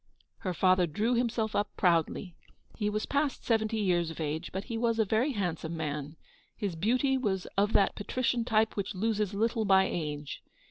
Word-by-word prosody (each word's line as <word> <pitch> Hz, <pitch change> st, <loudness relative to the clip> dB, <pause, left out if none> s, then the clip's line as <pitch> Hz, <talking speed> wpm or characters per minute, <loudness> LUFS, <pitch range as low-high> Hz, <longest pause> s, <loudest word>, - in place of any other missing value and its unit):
*' -, -, -50 dB
Her 185 Hz, -, 0 dB
father 185 Hz, -1 st, +4 dB
drew 215 Hz, +10 st, 0 dB
himself 235 Hz, -2 st, 0 dB
up 205 Hz, -, +1 dB
proudly. 175 Hz, 0 st, +1 dB, 0.4 s
He 210 Hz, -2 st, -1 dB
was 215 Hz, +1 st, -2 dB
past 285 Hz, -1 st, -1 dB
seventy 225 Hz, -1 st, +1 dB
years 175 Hz, -5 st, +1 dB
of 165 Hz, -, -8 dB
age, 155 Hz, +2 st, -3 dB
but 190 Hz, -, -3 dB
he 230 Hz, -, -5 dB
was 230 Hz, 0 st, +1 dB
a 220 Hz, -, +3 dB
very 230 Hz, +8 st, +1 dB
handsome 170 Hz, -5 st, -3 dB
man. 150 Hz, -1 st, -4 dB, 0.4 s
His 200 Hz, -6 st, -2 dB
beauty 255 Hz, -, +1 dB
was 190 Hz, -7 st, -1 dB
of 205 Hz, +2 st, +2 dB
that 195 Hz, -, +4 dB
patrician 240 Hz, +3 st, -1 dB
type 220 Hz, -1 st, +2 dB
which 200 Hz, 0 st, -3 dB
loses 210 Hz, 0 st, 0 dB
little 225 Hz, +1 st, +1 dB
by 190 Hz, -2 st, +5 dB
age. 150 Hz, -3 st, -4 dB
205 Hz, 185 wpm, -30 LUFS, 175-225 Hz, 0.4 s, by